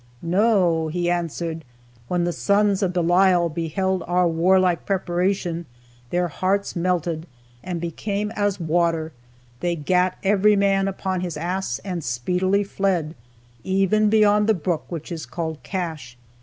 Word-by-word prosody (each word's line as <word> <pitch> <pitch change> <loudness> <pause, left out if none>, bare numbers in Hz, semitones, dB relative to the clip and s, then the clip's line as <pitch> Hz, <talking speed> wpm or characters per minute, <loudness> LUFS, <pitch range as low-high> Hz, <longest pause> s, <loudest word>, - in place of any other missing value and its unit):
"No," 180 -3 +2
he 175 +2 -1
answered; 165 -1 -3 0.4
"when 175 +3 0
the 175 0 0
sons 200 +3 +2
of 190 -3 +1
Belial 175 0 +3
beheld 180 +4 -1
our 180 0 +3
warlike 180 +1 +3
preparation, 180 -2 -1 0.4
their 175 0 +1
hearts 195 +5 -1
melted, 170 -2 -1 0.4
and 180 -2 -4
became 200 +5 -3
as 205 -2 -1
water; 165 -1 0 0.5
they 175 -1 0
gat 180 +4 +1
every 205 +1 +4
man 195 -1 +2
upon 190 -1 -2
his 175 -4 -4
ass, 175 -4 -2
and 180 -4 -3
speedily 180 +12 0
fled, 190 -6 -1 0.5
even 195 +3 +2
beyond 210 0 +4
the 220 - +4
brook 170 -1 -2
which 165 -1 -6
is 165 -2 -5
called 160 -3 -4
Cache." 160 -10 -5
180 Hz, 135 wpm, -23 LUFS, 170-195 Hz, 0.5 s, every